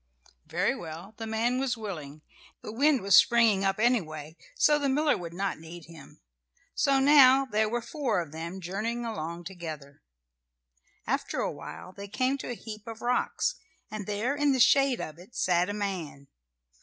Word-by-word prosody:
Very - - 0
well, 170 +5 -8
the 225 - -5
man 230 +3 0
was 260 -3 -1
willing; 155 -9 -7 0.4
the - - -6
wind 275 +4 +3
was 195 0 +4
springing 230 -5 +5
up, 195 +1 0
anyway, 160 -10 0 0.2
so 295 -11 +4
the 280 -1 0
miller 295 +3 +2
would 170 -2 -6
not 195 +1 -3
need 165 0 -10
him. 165 -3 -14 0.5
So 275 -1 +2
now 270 -1 +7
there 215 -4 0
were 240 +1 -2
four 260 - -1
of 165 -4 -5
them 170 +4 -6
journeying 220 +7 -3
along 170 -6 -5
together. 160 -6 -8 1.0
After - - -2
awhile 185 - -6
they 200 +1 -8
came 255 +6 0
to - - -6
a 245 - -3
heap 215 -1 -10
of 225 -1 -8
rocks, 250 - 0 0.4
and 215 -2 -6
there 215 +7 -1
in 290 -1 +2
the 260 - 0
shade 270 +1 +4
of 155 +1 -6
it 185 +7 -16
sat 180 +1 +2
a - - -1
man. 180 -9 -5
210 Hz, 170 wpm, -28 LUFS, 170-250 Hz, 1.0 s, now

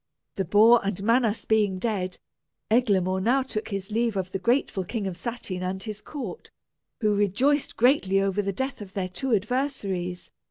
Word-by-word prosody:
The 195 - -2
boar 220 +6 +6
and 195 -1 -2
Manas 230 -1 +2
being 210 -4 +2
dead, 185 -3 -2 0.5
Eglamour 190 -6 +2
now 255 +6 +2
took 220 -4 -4
his 195 0 -5
leave 230 -1 0
of 185 -1 -3
the 195 - -2
grateful 235 -3 +1
King 210 +3 -4
of 190 -2 -3
Satyn 215 -4 -5
and 190 +1 -3
his 210 -2 -5
court, 245 - -7 0.5
who 210 -2 +3
rejoiced 205 +9 +1
greatly 225 -6 +3
over 195 +1 +1
the 200 -1 -2
death 265 +5 -3
of 195 -2 -9
their 185 -2 -2
two 265 +8 -3
adversaries. 200 -6 -2
205 Hz, 170 wpm, -26 LUFS, 190-235 Hz, 0.5 s, boar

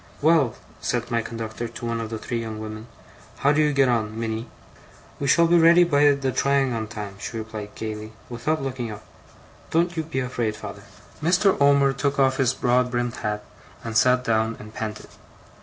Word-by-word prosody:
'Well,' 150 -6 +3 0.3
said 120 0 -2
my 115 -1 +2
conductor 115 0 -5
to 115 +1 -8
one 115 0 -1
of 110 - -5
the 110 - -4
three 115 +2 -3
young 110 -1 -5
women. 110 +1 -7 0.5
'How 140 - +3
do 150 +1 +3
you 150 -1 +3
get 140 -2 +3
on, 110 -2 0
Minnie?' 115 0 -3 0.7
'We 140 - -1
shall 170 +5 +5
be 170 +1 +5
ready 170 +2 +7
by 145 -4 +3
the 135 -1 -1
trying 140 -1 +2
on 110 -1 -3
time,' 105 -3 -7
she 115 - -5
replied 110 -2 -7
gaily, 110 0 -5 0.2
without 135 +5 -2
looking 130 -3 -3
up. 105 - -8 0.7
'Don't 170 +1 +1
you 160 - 0
be 155 -4 -3
afraid, 120 -4 -2
father.' - - -8 0.4
Mr. 185 +5 +3
Omer 140 -1 +5
took 140 +2 -1
off 130 -1 +3
his 130 -2 +3
broad 125 0 +2
brimmed 120 -1 -2
hat, 105 -1 -3 0.4
and 115 -1 -5
sat 125 +3 +4
down 110 -1 +1
and 105 +1 -11
panted. 110 -1 -5
120 Hz, 190 wpm, -24 LUFS, 110-140 Hz, 0.7 s, ready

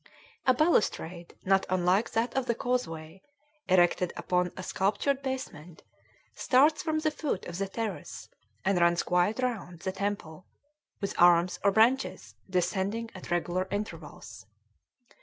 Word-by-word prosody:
A 255 - +7
balustrade 180 - 0
not 195 0 +3
unlike 185 +4 +1
that 230 +2 0
of 265 -1 0
the 235 - +1
causeway, 185 -9 -3 0.5
erected 180 -1 +3
upon 180 -1 0
a 185 - -5
sculptured 210 +10 0
basement, 180 - -6 0.5
starts 295 +4 +3
from 315 -1 -1
the 310 0 0
foot 290 -11 -3
of 175 +1 -6
the 195 - -1
terrace 220 +1 -5 0.4
and 190 -2 +2
runs 170 0 +3
quite 180 +5 +1
round 200 -9 -3
the 190 - -2
temple, 190 -4 -4 0.5
with 200 - -2
arms, 175 0 +5
or 200 - +5
branches, 235 +6 +2 0.2
descending 195 +5 -1
at 185 - -10
regular 175 +2 -1
intervals. 160 - -7
190 Hz, 135 wpm, -29 LUFS, 175-230 Hz, 0.5 s, A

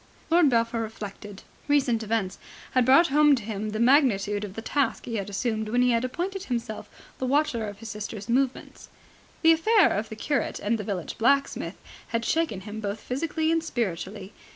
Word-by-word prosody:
Lord 335 -3 +5
Belpher 230 -1 +1
reflected. 205 -2 -8 0.2
Recent 275 -6 +2
events 215 -3 -2 0.3
had 255 -1 +3
brought 275 +7 +6
home 295 +1 +5
to 235 - -5
him 215 0 -4
the 215 +1 -4
magnitude 225 -6 +3
of 200 -2 -7
the 225 - -5
task 270 -4 0
he 230 -2 -3
had 200 0 -4
assumed 220 +1 -2
when 245 +2 +2
he 250 - +3
had 230 0 +1
appointed 370 +9 -3
himself 230 -4 -4 0.3
the 260 - -1
watcher 260 -5 +1
of 205 -1 -7
his 225 +1 -9
sister's 210 0 -6
movements. 260 +2 -1 0.5
The 325 - +7
affair 390 +4 +4
of 215 +2 -3
the 220 - -7
curate 280 +5 -1
and 220 +2 0
the - - -3
village 195 -2 -4
blacksmith 275 +4 +1 0.3
had 230 0 -2
shaken 320 - 0
him 210 +2 -7
both 205 0 -3
physically 315 +6 -1
and 330 -1 +1
spiritually. 200 - -4
230 Hz, 185 wpm, -26 LUFS, 210-275 Hz, 0.5 s, The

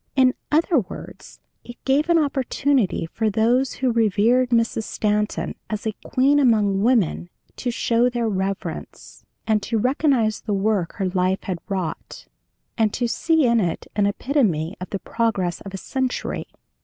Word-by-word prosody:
In 260 -2 +4 0.2
other 320 0 +3
words, 190 - -9 0.2
it 240 - -10
gave 285 +5 +2
an 340 - +5
opportunity 275 - +1
for 220 +6 -1
those 235 +5 +2
who 260 -2 0
revered 230 +3 +3
Mrs. 230 -1 +1
Stanton 210 0 -1 0.2
as 215 0 -4
a 220 - -1
queen 275 +3 +3
among 210 -7 +3
women 215 -7 +1 0.3
to 250 - -2
show 235 +1 +2
their 240 -2 -1
reverence, 195 -1 -5 0.2
and 215 -2 +2
to 225 +3 -1
recognize 250 -2 +1
the 210 -2 -2
work 195 -3 0
her 195 - -2
life 185 +1 0
had 180 -3 -3
wrought, 185 -4 -4 0.5
and 220 -2 +3
to 240 - 0
see 320 +4 +2
in 235 -1 +3
it 175 -5 -2
an 205 -1 +2
epitome 200 - 0
of 185 - -6
the 195 - -2
progress 195 -5 -1
of 195 - -8
a 195 - -5
century. 260 +5 -3
225 Hz, 155 wpm, -22 LUFS, 200-255 Hz, 0.5 s, an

